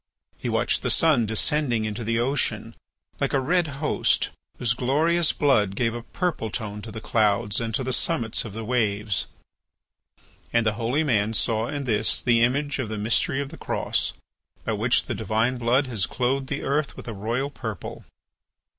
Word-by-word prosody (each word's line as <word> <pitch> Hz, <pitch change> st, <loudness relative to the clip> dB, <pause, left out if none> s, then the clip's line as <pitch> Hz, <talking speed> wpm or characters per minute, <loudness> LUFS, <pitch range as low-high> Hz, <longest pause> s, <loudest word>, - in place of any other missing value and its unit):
He -, -, -4 dB
watched -, -, +1 dB
the -, -, -1 dB
sun 140 Hz, -9 st, +4 dB
descending 120 Hz, +1 st, +1 dB
into 110 Hz, +2 st, -4 dB
the 115 Hz, +1 st, 0 dB
ocean 135 Hz, +5 st, -1 dB, 0.4 s
like -, -, 0 dB
a 140 Hz, -, +3 dB
red 170 Hz, +5 st, +2 dB
Host 145 Hz, +1 st, 0 dB, 0.3 s
whose 120 Hz, -2 st, +1 dB
glorious 155 Hz, +7 st, +2 dB
blood 105 Hz, -9 st, +2 dB
gave 115 Hz, +1 st, +1 dB
a 120 Hz, -, -5 dB
purple 150 Hz, -2 st, -2 dB
tone 105 Hz, -1 st, -4 dB
to 110 Hz, -, -8 dB
the 110 Hz, -, -6 dB
clouds 105 Hz, -1 st, +1 dB
and 115 Hz, -1 st, -2 dB
to 130 Hz, -, -1 dB
the 130 Hz, 0 st, -1 dB
summits 120 Hz, -7 st, +1 dB
of 110 Hz, -, -8 dB
the 110 Hz, +1 st, -5 dB
waves. 105 Hz, -4 st, 0 dB, 1.2 s
And 115 Hz, -1 st, +2 dB
the 110 Hz, -, +2 dB
holy 120 Hz, +7 st, 0 dB
man 110 Hz, -5 st, +1 dB
saw 110 Hz, +1 st, +1 dB
in 145 Hz, +1 st, -3 dB
this 110 Hz, -4 st, +1 dB
the 120 Hz, -2 st, +4 dB
image 140 Hz, +4 st, +1 dB
of 125 Hz, -5 st, -2 dB
the 110 Hz, -, -3 dB
mystery 115 Hz, +6 st, +1 dB
of 140 Hz, -, -9 dB
the -, -, -10 dB
Cross, -, -, 0 dB, 0.5 s
by -, -, 0 dB
which -, -, +2 dB
the -, -, -3 dB
divine 115 Hz, +3 st, 0 dB
blood 125 Hz, +4 st, +3 dB
has 115 Hz, -7 st, -1 dB
clothed 130 Hz, +2 st, -1 dB
the -, -, -3 dB
earth 140 Hz, +1 st, -1 dB
with -, -, -9 dB
a 115 Hz, -, -4 dB
royal 115 Hz, +7 st, -2 dB
purple. 110 Hz, -8 st, -6 dB
120 Hz, 180 wpm, -25 LUFS, 110-135 Hz, 1.2 s, sun